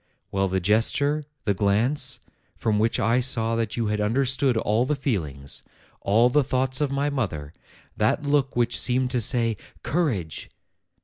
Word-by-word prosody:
Well, 95 0 +1
the 95 0 0
gesture, 130 - +1 0.2
the 100 - +1
glance, 115 +8 0 0.4
from 105 -2 0
which 115 +2 +1
I 115 +2 +2
saw 115 -3 +1
that 115 -1 -2
you 115 - 0
had 105 0 -1
understood 130 +3 +1
all 110 +1 +1
the 150 +4 0
feelings, 80 - -3 0.4
all 110 +5 +4
the 145 +4 +3
thoughts 130 +1 0
of 145 -2 0
my 140 +1 0
mother; 80 - -3 0.4
that 110 +7 +1
look 140 -2 +1
which 120 -1 +2
seemed 125 0 +1
to 125 -2 +1
say, 115 -2 +2 0.3
'Courage 120 - -2
120 Hz, 160 wpm, -24 LUFS, 105-135 Hz, 0.4 s, all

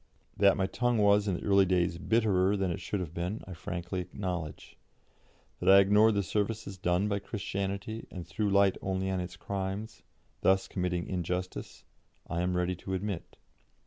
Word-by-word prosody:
That 100 0 +4
my 95 - +2
tongue 120 +4 0
was 105 0 +4
in 95 - +1
the - - -6
early 100 -1 +4
days 85 -2 +1
bitterer 105 -3 +2
than 95 -2 0
it 95 - -4
should 100 +2 -2
have 85 -3 -6
been, 90 +6 -3
I 95 - -8
frankly 85 +2 -4
acknowledge; 90 -4 -5 0.8
that - - +1
I 95 - +9
ignored 105 +3 +5
the 100 - +1
services 105 +2 -2
done 90 +2 +1
by 100 -1 0
Christianity 100 +1 -4
and 90 -2 -7
threw 105 -2 -1
light 100 -1 +4
only 95 0 -1
on 95 - -1
its 90 0 -5
crimes, 100 +3 -4 0.4
thus 95 0 +3
committing 90 -2 -2
injustice, 90 0 -4 0.4
I 85 0 -2
am 90 0 0
ready 90 +1 0
to 95 +1 -4
admit. 95 -2 -4
95 Hz, 175 wpm, -30 LUFS, 90-100 Hz, 0.8 s, I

